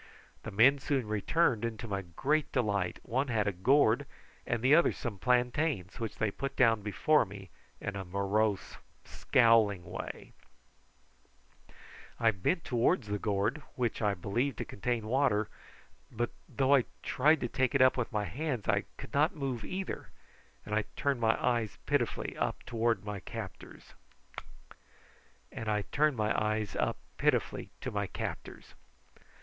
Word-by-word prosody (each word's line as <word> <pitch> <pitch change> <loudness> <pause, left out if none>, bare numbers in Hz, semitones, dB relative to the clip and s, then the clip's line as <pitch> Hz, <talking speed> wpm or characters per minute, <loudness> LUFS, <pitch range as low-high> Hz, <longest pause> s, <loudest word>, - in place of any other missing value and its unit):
The - - -6
men 130 +8 +5
soon 135 -4 -1
returned, 110 - +1
and 115 -2 -3
to 115 - -6
my 100 -2 -2
great 135 - -1
delight 100 -8 0
one 130 +4 -1
had 110 -5 0
a - - +2
gourd 125 +6 +3 0.4
and 120 -3 -1
the 130 +3 +5
other 170 +2 +6
some 110 -6 -5
plantains, 125 - 0
which 115 -2 -4
they 110 -2 0
put 135 +6 -4
down 115 -4 +4
before 105 +10 +3
me 95 -2 -10 0.3
in 100 - -4
a 100 - -4
morose, 100 +2 -1 0.3
scowling 115 -6 +3
way. - - -7 1.9
I 115 -1 +4
bent 130 - -1
towards 120 - +1
the 105 0 -1
gourd, 105 +9 0
which 120 -2 -1
I 105 -2 +2
believed 115 +8 -1
to - - -3
contain 115 +2 -2
water; 110 -3 +2 0.6
but 120 +1 -2 0.2
though 135 0 +2
I 135 -4 +5 0.2
tried 155 +4 +3
to - - 0
take 130 +3 0
it 130 -1 +6
with 125 -1 -2
my 105 -2 -1
hands 135 -5 -3
I - - +2
could - - -10
not 155 +7 +3
move 130 -6 -3
either, 190 - -5 0.6
and 105 - -5
I 110 0 +1
turned 140 -4 0
my 115 0 +3
eyes 120 -3 0
up - - -33
pitifully - - 0 0.4
to 115 -1 +1
my 105 -1 -5
captors. 105 +1 -8
115 Hz, 135 wpm, -31 LUFS, 105-135 Hz, 1.9 s, other